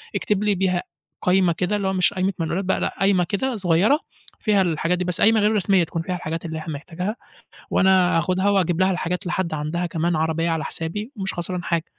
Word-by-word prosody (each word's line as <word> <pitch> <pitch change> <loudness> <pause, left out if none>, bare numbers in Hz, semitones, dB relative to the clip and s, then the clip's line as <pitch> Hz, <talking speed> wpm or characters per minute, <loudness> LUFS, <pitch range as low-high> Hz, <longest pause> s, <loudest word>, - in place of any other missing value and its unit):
اكتب 210 -1 0
لي 210 -1 +2
بيها 180 -1 0 0.4
قايمة 180 -1 +3
كده 180 +4 -1
اللي 200 -2 -1
هو 190 - 0
مش 185 +1 +3
قايمة 190 0 0
منقولات 170 +4 -1
بقى 190 - +1
لأ، - - -2
قايمة 195 -2 +3
كده 220 +9 -2
صغيرة 190 - +3 0.4
فيها 210 -3 +2
الحاجات 170 0 0
دي 180 - -1
بس، 180 -1 -2
قايمة 220 +1 +5
غير 210 +1 +3
رسمية 195 -2 +3
تكون 165 0 -3
فيها 180 +2 -3
الحاجات 165 -1 -5
اللي 160 -1 -4
إحنا 155 0 -5
محتاجها 175 +8 -4 0.6
وأنا 185 -2 +4
هاخدها 185 +4 +1
وأجيب 180 -3 +1
لها 185 0 +4
الحاجات 180 +1 -2
لحد 175 -2 -1
عندها 155 +4 -2
كمان 170 0 -1
عربية 160 +1 0
على 160 -2 -1
حسابي، 205 - -5
مش 195 -2 -3
خسران 175 0 -3
حاجه، 165 -2 0
180 Hz, 210 wpm, -22 LUFS, 165-195 Hz, 0.6 s, قايمة